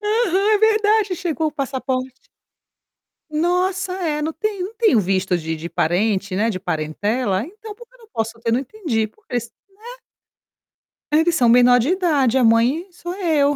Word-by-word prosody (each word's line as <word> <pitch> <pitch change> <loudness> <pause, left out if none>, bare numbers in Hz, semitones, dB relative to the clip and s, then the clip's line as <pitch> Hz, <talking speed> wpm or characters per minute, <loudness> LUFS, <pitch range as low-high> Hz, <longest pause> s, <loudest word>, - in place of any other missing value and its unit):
Aham 420 -2 +1
é - - +3
verdade 430 -2 +3
chegou 325 -3 -1
o - - -9
passaporte. 260 -2 -4 1.0
Nossa, 360 +4 0
é, 325 -5 -2
não 320 +1 -2
tenho 400 +1 -3
não 410 - -9
tenho 440 - +3
visto 185 -1 0
de 160 -1 -4
de 160 +2 -7
parente, 190 +3 0
né, 215 +4 +1
de 190 -4 -3
parentela? 190 +5 -1
Então 420 +5 -11
por 475 +2 -14
que - - -33
eu - - -22
não 455 - -18
posso 225 +1 -3
ter? 230 0 -2
Não 235 - +2
entendi. 275 - -2
Porque 420 - -17
eles 235 -1 -2 0.2
né. 405 +3 -21 1.3
Eles 325 +3 +3
são 245 -7 +3
menor 245 +1 +6
de 245 +5 0
idade, 305 -9 +2
a 260 - +3
mãe 240 - +3
sou 350 0 -7
eu. 305 -7 +1
290 Hz, 175 wpm, -20 LUFS, 225-375 Hz, 1.3 s, menor